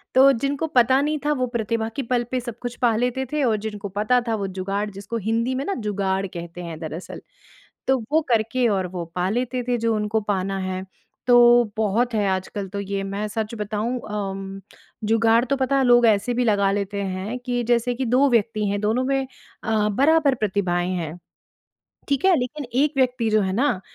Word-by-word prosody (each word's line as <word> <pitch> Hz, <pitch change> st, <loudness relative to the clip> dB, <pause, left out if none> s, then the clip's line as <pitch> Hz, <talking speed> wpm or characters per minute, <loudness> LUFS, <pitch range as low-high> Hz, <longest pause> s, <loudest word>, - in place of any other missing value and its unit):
तो 270 Hz, +1 st, +8 dB
जिनको 275 Hz, +5 st, -1 dB
पता 260 Hz, -2 st, +4 dB
नहीं 305 Hz, +1 st, 0 dB
था 300 Hz, -, +2 dB
वो 255 Hz, -, +2 dB
प्रतिभा 230 Hz, -1 st, -2 dB
के -, -, -1 dB
पल 245 Hz, 0 st, 0 dB
पे 255 Hz, -, 0 dB
सब 240 Hz, -2 st, -7 dB
कुछ 245 Hz, -1 st, -4 dB
पा 235 Hz, -3 st, +3 dB
लेते 250 Hz, +3 st, 0 dB
थे 300 Hz, -1 st, 0 dB
और 225 Hz, -4 st, +2 dB
जिनको 210 Hz, -2 st, -5 dB
पता 215 Hz, +4 st, +3 dB
था 225 Hz, -, +1 dB
वो 200 Hz, -2 st, -3 dB
जुगाड़ 195 Hz, +2 st, -3 dB
जिसको 200 Hz, +4 st, -5 dB
हिंदी 230 Hz, +4 st, 0 dB
में 265 Hz, -, -2 dB
ना 400 Hz, -, -1 dB
जुगाड़ 195 Hz, -3 st, -1 dB
कहते 170 Hz, -1 st, -8 dB
हैं 165 Hz, -2 st, -7 dB
दरअसल, 160 Hz, +2 st, -7 dB, 0.7 s
तो 265 Hz, 0 st, +4 dB
वो 315 Hz, +1 st, +4 dB
करके 235 Hz, +2 st, +2 dB
और 190 Hz, -3 st, 0 dB
वो 175 Hz, -1 st, -5 dB
पा 180 Hz, +1 st, 0 dB
लेते 250 Hz, +3 st, -1 dB
थे 245 Hz, -1 st, +1 dB
जो 230 Hz, -1 st, 0 dB
उनको 215 Hz, +1 st, 0 dB
पाना 195 Hz, -1 st, -1 dB
है। 185 Hz, 0 st, -3 dB, 0.4 s
तो 240 Hz, 0 st, +7 dB
बहुत 220 Hz, +3 st, +1 dB
है 210 Hz, -2 st, +1 dB
आजकल 190 Hz, +1 st, -3 dB
तो 200 Hz, +1 st, -5 dB
ये 200 Hz, 0 st, -3 dB
मैं 200 Hz, +2 st, -3 dB
सच 220 Hz, +1 st, -3 dB
बताऊँ 215 Hz, +4 st, -2 dB
अम, 195 Hz, -1 st, -4 dB, 0.4 s
जुगाड़ 225 Hz, +1 st, +3 dB
तो 275 Hz, -, 0 dB
पता 265 Hz, +1 st, +1 dB
है 270 Hz, -, +3 dB
लोग 240 Hz, -1 st, +6 dB
ऐसे 215 Hz, +3 st, +2 dB
भी 245 Hz, +1 st, +1 dB
लगा 200 Hz, -3 st, +3 dB
लेते 200 Hz, 0 st, -2 dB
हैं 190 Hz, +5 st, -4 dB
कि 245 Hz, -1 st, -1 dB
जैसे 240 Hz, +1 st, +2 dB
कि 260 Hz, +2 st, -2 dB
2 255 Hz, +4 st, +3 dB
व्यक्ति 215 Hz, -2 st, +1 dB
हैं, 200 Hz, 0 st, -1 dB
दोनों 220 Hz, +4 st, +1 dB
में 270 Hz, 0 st, 0 dB, 0.4 s
अ, 215 Hz, -1 st, +1 dB
बराबर 280 Hz, +5 st, +3 dB
प्रतिभाएँ 185 Hz, -5 st, 0 dB
हैं, 165 Hz, -1 st, -4 dB, 0.9 s
ठीक 280 Hz, +3 st, +1 dB
है? 380 Hz, -2 st, +6 dB
लेकिन 265 Hz, +4 st, -4 dB, 0.2 s
1 300 Hz, -, 0 dB
व्यक्ति 250 Hz, -3 st, +1 dB
जो 215 Hz, 0 st, +3 dB
है 190 Hz, -1 st, -1 dB
ना 240 Hz, -3 st, +1 dB
220 Hz, 205 wpm, -23 LUFS, 200-250 Hz, 0.9 s, तो